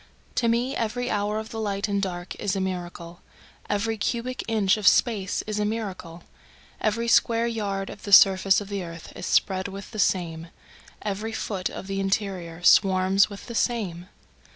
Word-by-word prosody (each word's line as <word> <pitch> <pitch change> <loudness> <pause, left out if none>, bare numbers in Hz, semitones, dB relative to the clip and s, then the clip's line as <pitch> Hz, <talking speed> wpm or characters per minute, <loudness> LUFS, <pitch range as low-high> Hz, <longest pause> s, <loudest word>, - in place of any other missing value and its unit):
To 235 - +1
me 235 +3 +1
every 245 +2 -2
hour 210 +1 0
of 220 0 -5
the 225 - -6
light 200 -1 -1
and 200 -1 0
dark 175 -2 -4
is 200 -1 -1
a - - -1
miracle, 175 -2 -5 0.5
Every 215 +2 -1
cubic 240 +4 -2
inch 210 -4 +2
of 215 -2 -1
space 205 -5 +3
is 215 -1 -3
a - - +1
miracle, 195 -6 -4 0.6
Every 225 +2 0
square 230 0 +3
yard 200 -4 -2
of 205 - -11
the 205 - -7
surface 195 -1 +7
of 205 - -7
the 200 -2 -3
earth 165 -1 -9
is - - -6
spread 190 -1 +1
with 195 0 -9
the 215 - -6
same, 165 -4 0 0.6
Every 210 +2 -3
foot 195 -4 -3
of - - -8
the 195 0 -3
interior 190 -4 -2
swarms 190 +1 +5
with 200 -1 -9
the 235 - -7
same. 200 -8 -1
200 Hz, 175 wpm, -25 LUFS, 185-220 Hz, 0.6 s, surface